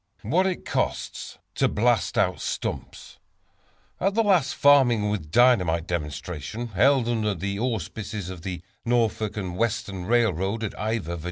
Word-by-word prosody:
What 175 Hz, -, +2 dB
it 185 Hz, -, -3 dB
Costs -, -, -3 dB, 0.2 s
to -, -, +2 dB
Blast 115 Hz, 0 st, +1 dB
Out -, -, +2 dB
Stumps. -, -, -5 dB, 0.8 s
At 195 Hz, +1 st, 0 dB
the 225 Hz, -, +3 dB
latest 180 Hz, -10 st, +2 dB
"Farming 120 Hz, -7 st, +4 dB
with 80 Hz, -8 st, -4 dB
Dynamite" 90 Hz, -7 st, +3 dB
demonstration, 85 Hz, -, -4 dB
held 125 Hz, +5 st, +3 dB
under 110 Hz, -4 st, 0 dB
the 100 Hz, +3 st, -3 dB
auspices 110 Hz, -4 st, -3 dB
of 90 Hz, -3 st, -9 dB
the 90 Hz, -1 st, -5 dB, 0.2 s
Norfolk 110 Hz, -3 st, 0 dB
and 90 Hz, -4 st, -4 dB
Western 105 Hz, -4 st, -2 dB
Railroad, 110 Hz, -2 st, +1 dB
at 110 Hz, -, -3 dB
Ivor, 105 Hz, -5 st, -2 dB
Va. -, -, -9 dB
110 Hz, 145 wpm, -25 LUFS, 90-120 Hz, 0.8 s, Farming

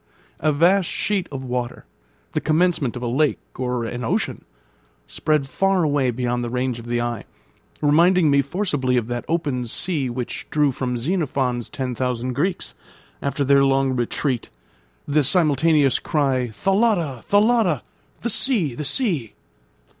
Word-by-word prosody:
A 155 Hz, -, +2 dB
vast 175 Hz, +5 st, +3 dB
sheet 200 Hz, -3 st, -1 dB
of 135 Hz, -2 st, -5 dB
water, 125 Hz, -1 st, -4 dB, 0.5 s
the -, -, -1 dB
commencement 155 Hz, -5 st, +1 dB
of 125 Hz, -, -5 dB
a -, -, -1 dB
lake 140 Hz, +5 st, +1 dB, 0.2 s
or 125 Hz, -2 st, -1 dB
an 120 Hz, +2 st, -5 dB
ocean, 115 Hz, -, -2 dB, 0.6 s
spread 150 Hz, -3 st, 0 dB
far 195 Hz, +5 st, +1 dB
away 145 Hz, -4 st, +1 dB
beyond 120 Hz, 0 st, -1 dB
the 120 Hz, -, -3 dB
range 125 Hz, 0 st, -2 dB
of 115 Hz, -, -10 dB
the 120 Hz, 0 st, 0 dB
eye, 120 Hz, -2 st, -3 dB, 0.6 s
reminding 165 Hz, +2 st, +4 dB
me 140 Hz, 0 st, +4 dB
forcibly 140 Hz, -5 st, -1 dB
of 120 Hz, -, 0 dB
that 120 Hz, 0 st, -3 dB
open 145 Hz, -7 st, -1 dB
sea 145 Hz, +1 st, -1 dB
which 120 Hz, 0 st, -5 dB
drew 150 Hz, -2 st, +2 dB
from 125 Hz, -1 st, -3 dB
Xenophon's 130 Hz, -, -1 dB
ten 130 Hz, -2 st, -3 dB
thousand 125 Hz, +1 st, -2 dB
Greeks, 175 Hz, +7 st, -2 dB, 0.5 s
after 140 Hz, 0 st, -1 dB
their 140 Hz, 0 st, +5 dB
long 135 Hz, -1 st, +2 dB
retreat, 120 Hz, +1 st, -2 dB, 0.6 s
the 145 Hz, +1 st, +2 dB
simultaneous 150 Hz, -2 st, +3 dB
cry, 135 Hz, -5 st, 0 dB
"Thalatta! 175 Hz, -, +1 dB
thalatta!" 220 Hz, +3 st, +3 dB, 0.4 s
the 235 Hz, -, -1 dB
sea! 200 Hz, -, +2 dB
the 150 Hz, +5 st, -5 dB
sea! 160 Hz, -, -1 dB
140 Hz, 145 wpm, -22 LUFS, 125-165 Hz, 0.6 s, their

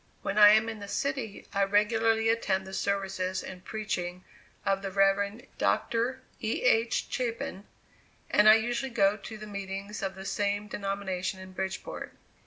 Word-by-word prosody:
When 210 Hz, -, 0 dB
I 205 Hz, 0 st, +11 dB
am 220 Hz, +1 st, +4 dB
in 220 Hz, -1 st, -5 dB
the 200 Hz, -, -7 dB
city, 265 Hz, -2 st, -3 dB
I 200 Hz, -1 st, +3 dB
regularly 225 Hz, +2 st, +2 dB
attend 195 Hz, -4 st, +1 dB
the 190 Hz, -, -9 dB
services 190 Hz, -2 st, -1 dB
and 185 Hz, -1 st, -9 dB
preaching 185 Hz, -4 st, -4 dB, 0.4 s
of 195 Hz, -1 st, +1 dB
the 195 Hz, -, -3 dB
Rev. 200 Hz, +3 st, +2 dB
Dr. 235 Hz, +3 st, +1 dB, 0.2 s
E. 220 Hz, 0 st, -1 dB
H. 230 Hz, -2 st, +3 dB
Chapin, 235 Hz, -4 st, -3 dB, 0.6 s
and 210 Hz, +1 st, +6 dB
I 215 Hz, -, +10 dB
usually 240 Hz, +3 st, -1 dB
go 200 Hz, -4 st, +3 dB
to 215 Hz, +2 st, -9 dB
the 215 Hz, -, -8 dB
meetings 200 Hz, 0 st, -5 dB
of 195 Hz, -1 st, -3 dB
the 190 Hz, 0 st, -8 dB
same 205 Hz, +1 st, -1 dB
denomination 195 Hz, -2 st, -3 dB
in 185 Hz, 0 st, -10 dB
Bridgeport. 190 Hz, 0 st, -5 dB
200 Hz, 160 wpm, -29 LUFS, 195-225 Hz, 0.6 s, I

